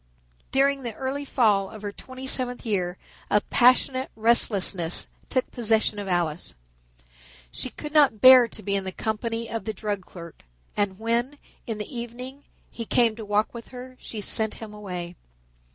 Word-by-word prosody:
During 275 +1 +2
the 235 -4 -6
early 275 +2 -4
fall 210 -8 +2
of 215 -1 -11
her 205 - -4
twenty 260 +5 -10
seventh 250 -2 -1
year 185 -5 -1 0.3
a 210 - +4
passionate 255 +4 +2
restlessness 200 -6 +3 0.2
took 255 - 0
possession 220 -3 0
of 200 - -6
Alice. 170 - -1 1.0
She - - -5
could 300 0 -9
not 285 -8 +4
bear 255 -1 +9
to 215 - -9
be 200 +1 -1
in 195 - -1
the 190 - -5
company 225 +3 -3
of 225 0 -5
the 220 - -3
drug 205 -1 -4
clerk, 170 -2 -12 0.3
and 200 -2 -1
when, 235 +6 -1 0.3
in 225 -2 -3
the 210 +5 -7
evening, 250 +4 -8 0.3
he 230 - -6
came 230 0 +2
to 225 - -8
walk 210 +1 0
with 235 -1 -9
her 255 0 -10
she 215 - -7
sent 220 +2 +6
him 220 -2 -9
away. 180 -4 -7
225 Hz, 170 wpm, -25 LUFS, 205-250 Hz, 1.0 s, bear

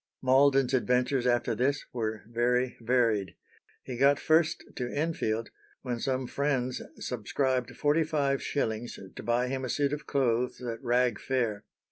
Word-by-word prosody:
Malden's 135 0 +4
adventures 125 +1 +2
after 120 -1 +2
this 135 +5 0
were 110 -3 -3
very 125 +2 +1
varied. 115 -7 +1 0.5
He 125 - -6
got 140 +1 +5
first 160 0 +2
to 125 -1 -3
Enfield, 130 -8 -1 0.3
when 125 -3 -3
some 130 +1 -1
friends 130 -2 -1 0.2
subscribed 125 +2 -2
forty 150 +2 +3
five 140 -3 0
shillings 115 -4 -2 0.2
to - - -6
buy 120 +2 +1
him 130 +1 -3
a 130 - -3
suit 145 +1 +1
of 150 - -5
clothes 125 -3 +1
at 115 -2 -5
Rag 120 -1 +2
Fair. 115 -6 -1
125 Hz, 145 wpm, -29 LUFS, 120-140 Hz, 0.5 s, got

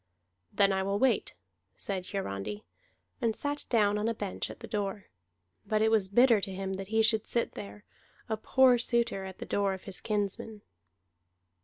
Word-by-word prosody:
"Then 200 -1 +3
I 190 - +1
will 200 +1 0
wait," 265 +3 +1 0.4
said 190 -2 -4
Hiarandi, 105 - -4 0.6
and 225 -2 +1
sat 290 0 -3
down 210 -3 +3
on 215 - 0
a 230 - 0
bench 205 -3 -4
at - - -9
the - - -7
door. 200 -1 -3 0.6
But 215 0 +1
it 220 - +3
was 215 -4 +3
bitter 235 0 +5
to 195 - -3
him 190 0 -4
that 190 0 -5
he 220 +1 +2
should 220 -1 +3
sit 235 - 0
there, 100 +1 -9 0.4
a 220 - 0
poor 250 +3 +4
suitor, 235 -5 0
at 190 -1 -8
the - - -7
door 200 -1 0
of 190 - -12
his 195 -2 -4
kinsman. 210 0 -2
205 Hz, 180 wpm, -30 LUFS, 195-225 Hz, 0.6 s, bitter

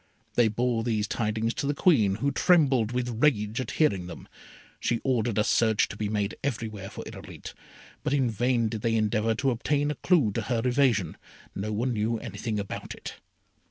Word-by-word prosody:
They 120 -2 +4
bore 115 +1 0
these 110 -3 0
tidings 110 +1 -1
to 140 - -3
the 145 - 0
Queen, 115 - +3
who 140 +6 0
trembled 135 -12 +3
with 125 -2 -2
rage 110 -5 +2
at 125 - -5
hearing 100 - +2
them. 90 - -10 0.5
She 115 - 0
ordered 120 -4 0
a 105 - +4
search 110 -1 +3
to - - -7
be 105 -1 -3
made 105 -1 -1
everywhere 110 -7 -3
for - - -8
Irolite, - - -9 0.5
but - - -2
in 135 -3 +2
vain 120 +1 +1
did 110 -1 -4
they 115 0 +1
endeavour 110 +1 +1
to 135 +4 +1
obtain 145 +4 0
a - - -4
clue 155 - +3
to 115 - -2
her 115 +1 -1
evasion, 120 - +2 0.4
no 105 +3 -4
one 120 +4 -1
knew 110 +1 0
anything 110 0 -4
about 100 - -6
it. - - -8
115 Hz, 190 wpm, -27 LUFS, 105-125 Hz, 0.5 s, They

